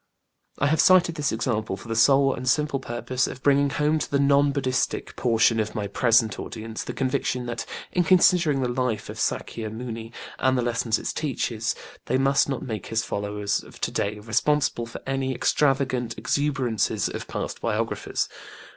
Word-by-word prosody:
I - - +1
have 155 +2 +3
cited 180 -2 +5
this 150 -4 -1
example 110 -3 -1
for 100 - -12
the 115 - -2
sole 135 +4 +5
and 130 0 -2
simple 150 +2 +1
purpose 130 +1 -2
of 130 - -8
bringing 140 0 +4
home 150 +2 +1
to - - -3
the 140 - +1
non 140 0 +4
BudĖĢdĖĢhistic 130 -2 -1
portion 115 -1 +3
of 110 0 -2
my 105 - -2
present 115 +1 +2
audience 110 0 -6
the - - -5
conviction 130 -1 -1
that, 115 -1 -4 0.2
in 180 - +2
considering 170 -5 +4
the - - +1
life 120 -2 -2
of - - -9
SÄkya 110 -2 -2
Muni 115 0 -6 0.3
and 130 0 +2
the 125 - +1
lessons 115 -1 0
it - - -3
teaches, 120 -6 -2 0.3
they 130 - +1
must 135 +1 +3
not 135 - -2
make 110 -6 -5
his 115 0 -1
followers 105 0 -2
of - - -14
to - - -1
day 105 +1 -1
responsible 120 +3 0
for 115 - -9
any 135 -1 -1
extravagant 130 -5 +1
exuberances 130 -2 0
of - - -6
past - - -5
biographers. 115 0 -1
125 Hz, 175 wpm, -25 LUFS, 115-140 Hz, 0.3 s, cited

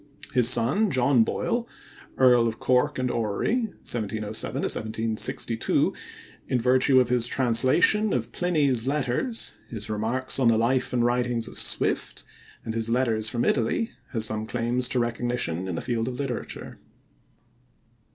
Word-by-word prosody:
His 125 -2 +4
son, 140 - +3
John 130 -3 +3
Boyle, 235 - -2 0.5
Earl 125 -2 +5
of 110 - -3
Cork 125 0 +1
and 130 -1 -1
Orrery 120 - -1 0.2
(1707 110 -2 -3
1762), 110 +1 -1 0.5
in 125 - 0
virtue 130 +2 +4
of 125 -2 +2
his 120 -1 +2
translation 130 - +3
of - - -2
Pliny's 145 -9 +1
Letters, 145 - -1 0.2
his 110 -2 -6
Remarks 120 +6 -1
on 130 - +3
the 115 -1 +4
Life 125 +3 +1
and 120 -1 +1
Writings 120 -1 0
of - - -8
Swift, - - -1 0.4
and 110 - -4
his 115 0 0
Letters 115 -3 +1
from 120 0 -1
Italy, 130 - 0 0.2
has 110 -3 0
some 110 0 -1
claims 120 +3 0
to 125 - -3
recognition 120 -7 -2
in 90 - -3
the - - -3
field 115 -1 -2
of 130 - -4
literature. 135 -4 -5
120 Hz, 140 wpm, -25 LUFS, 115-130 Hz, 0.5 s, Earl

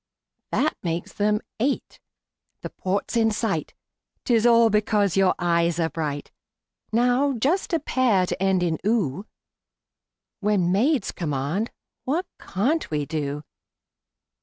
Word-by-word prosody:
That 310 - +1
makes 170 -1 -3
them 210 +1 +1 0.2
eight. 270 +5 -1 0.6
The - - -5
port's 195 +5 -2
in 225 -1 +4
sight 210 -7 -2 0.5
'Tis 235 -1 +3
all 230 -1 +5
because 210 -3 +2
your 190 -1 +3
eyes 170 -1 +1
are 165 -1 0
bright! 145 -3 -4 0.6
Now 250 +4 +3
just 285 - 0
a 330 - +2
pair 245 -10 +2
to 180 - -4
end 190 -2 +2
in 165 -3 0
"oo" 200 - 0 1.1
When 195 -4 +1
maids 240 +4 +2
command, 155 - -2 0.3
what 320 +8 -1
can't 275 - -1
we 150 -2 -1
do? 145 -1 -3
205 Hz, 125 wpm, -24 LUFS, 170-235 Hz, 1.1 s, all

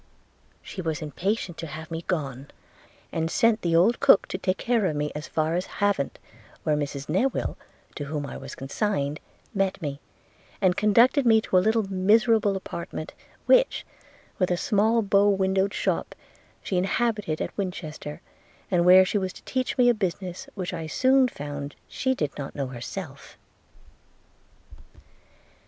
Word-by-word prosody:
She 190 - -6
was 160 -2 -3
impatient 180 +3 -2
to 165 - -5
have 160 +2 -8
me 165 0 -3
gone; 140 -6 -3 0.6
and 160 0 -1
sent 225 +4 +3
the 170 -1 +1
old 195 +8 +4
cook, 275 -8 +5
to 185 - -3
take 185 -1 0
care 235 -5 +1
of 155 - -2
me, 150 0 -1
as 150 +1 -6
far 155 0 0
as 180 +2 -1
Havant, 200 -9 0 0.5
where 155 - +2
Mrs 140 -1 -3
Newill, 220 - 0 0.4
to 145 - -5
whom 145 0 -3
I 140 - -7
was - - -8
consigned, 145 0 -2 0.3
met 195 -2 0
me, 140 -3 -4 0.6
and 185 -3 +3
conducted 235 +7 +4
me 225 -1 +6
to 190 - -3
a - - +8
little 220 +3 +2
miserable 205 +2 +3
apartment, 170 -4 -6 0.3
which, - - +4 0.5
with 185 - +2
a 175 - +1
small 220 +4 +2
bow 200 0 +4
windowed 190 0 +2
shop, - - -2 0.5
she 185 - -1
inhabited 210 -4 0
at - - -4
Winchester, 160 -6 -5 0.5
and 175 -2 +3
where 185 +1 +9
she 205 - 0
was 190 -1 -2
to - - -14
teach 255 -1 -2
me 250 -1 +5
a 245 - +6
business 190 +2 -4
which 185 -3 -4
I 165 -2 -4
soon 260 +9 +4
found 145 - -6
she 260 -1 -1
did 150 - -2
not 140 - -6
know 140 - -2
herself. 135 +4 -8
185 Hz, 160 wpm, -26 LUFS, 155-210 Hz, 0.6 s, where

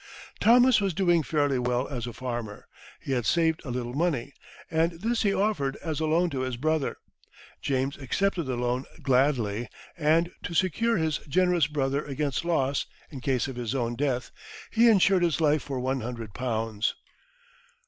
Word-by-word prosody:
Thomas 245 0 +6
was 195 -4 0
doing 175 -3 +3
fairly 145 -3 +1
well 125 +1 0
as 125 -3 -4
a - - -4
farmer; 120 -3 -5 0.3
he - - -6
had 120 -5 0
saved 165 -2 +2
a 135 - -7
little 120 0 -3
money, 140 -4 -1 0.4
and 165 +1 +2
this 225 +8 -1
he 205 - +2
offered 195 -10 0
as 160 -3 -4
a 160 - 0
loan 170 +2 +2
to 135 - -3
his 130 -2 -2
brother. 155 +2 0 0.6
James 135 0 -1
accepted 170 +6 -1
the 130 - -1
loan 125 +2 -1 0.2
gladly; 125 -5 +1 0.3
and, 165 +2 +2
to 170 - -5
secure 225 +7 +2
his 160 -2 0
generous 180 -2 +3
brother 140 -1 -1
against 140 0 -2
loss 140 -5 0 0.2
in 135 -4 -8
case 130 0 0
of 130 -2 -7
his 120 +1 -3
own 120 -2 -1
death, 125 -2 -1 0.4
he 235 +1 +5
insured 195 -3 +4
his 170 -2 +1
life 155 -2 +3
for 135 -1 -4
one 130 +1 -1
hundred 115 -3 -6
pounds. 115 -2 -1
140 Hz, 170 wpm, -27 LUFS, 125-170 Hz, 0.6 s, Thomas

